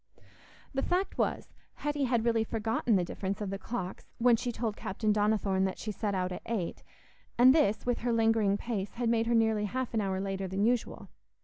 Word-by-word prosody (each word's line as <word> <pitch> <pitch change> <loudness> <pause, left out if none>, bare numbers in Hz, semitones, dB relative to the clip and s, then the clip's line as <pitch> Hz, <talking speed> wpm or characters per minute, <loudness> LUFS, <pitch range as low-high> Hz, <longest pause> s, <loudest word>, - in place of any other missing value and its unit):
The 270 - 0
fact 370 +5 -1
was, - - -1 0.2
Hetty 295 -1 -1
had 240 -2 +1
really 230 -1 +3
forgotten 225 +1 0
the 185 - +3
difference 195 +2 -4
of 205 -2 -3
the 195 - -4
clocks 190 -6 -5
when 240 0 +5
she 245 +1 -2
told 225 -3 -3
Captain 210 +3 -1
Donnithorne 205 -2 +1
that 190 - -2
she 215 - -4
set 205 -1 -2
out 185 0 -1
at 180 - -5
eight, 210 -7 -3 0.6
and 255 +2 +8
this, 285 -9 +2
with 245 -1 0
her 240 - -1
lingering 225 -3 +3
pace, 205 -3 -4
had 240 -1 0
made 230 -1 +2
her 235 - +2
nearly 220 -2 +2
half 255 +4 -3
an 220 - +1
hour 190 -1 -1
later 195 0 -3
than 190 +2 -1
usual. 240 0 -1
220 Hz, 205 wpm, -30 LUFS, 195-240 Hz, 0.6 s, and